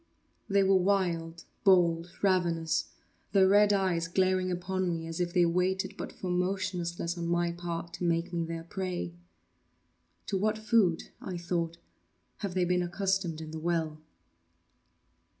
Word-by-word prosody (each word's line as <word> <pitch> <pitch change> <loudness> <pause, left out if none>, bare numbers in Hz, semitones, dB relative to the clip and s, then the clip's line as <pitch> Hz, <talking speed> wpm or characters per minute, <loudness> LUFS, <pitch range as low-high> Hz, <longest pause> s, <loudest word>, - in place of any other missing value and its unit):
They 200 0 +4
were 190 0 +5
wild, 175 -4 0 0.2
bold, 175 -3 +4
ravenous—their 180 +1 +1
red 205 +1 +5
eyes 185 -4 +1
glaring 185 +1 +2
upon 185 +1 -1
me 165 -1 -2
as 165 +1 -5
if 175 -1 0
they 175 -1 +4
waited 180 +2 0
but - - -6
for 185 - -5
motionlessness 180 -2 -1
on 170 - -2
my 175 0 +1
part 170 0 -5
to - - -6
make 170 0 0
me 170 -1 0
their 165 0 -5
prey. 180 - -4 1.1
“To 195 - -1
what 215 +2 +1
food,” 215 -6 +2
I 185 -2 -5
thought, 170 -1 -2 0.6
“have 200 -3 -4
they 180 -1 +2
been 180 0 +2
accustomed 175 -2 -1
in 155 -1 -7
the 160 - -5
well? 160 -2 -1
175 Hz, 145 wpm, -30 LUFS, 170-190 Hz, 1.1 s, were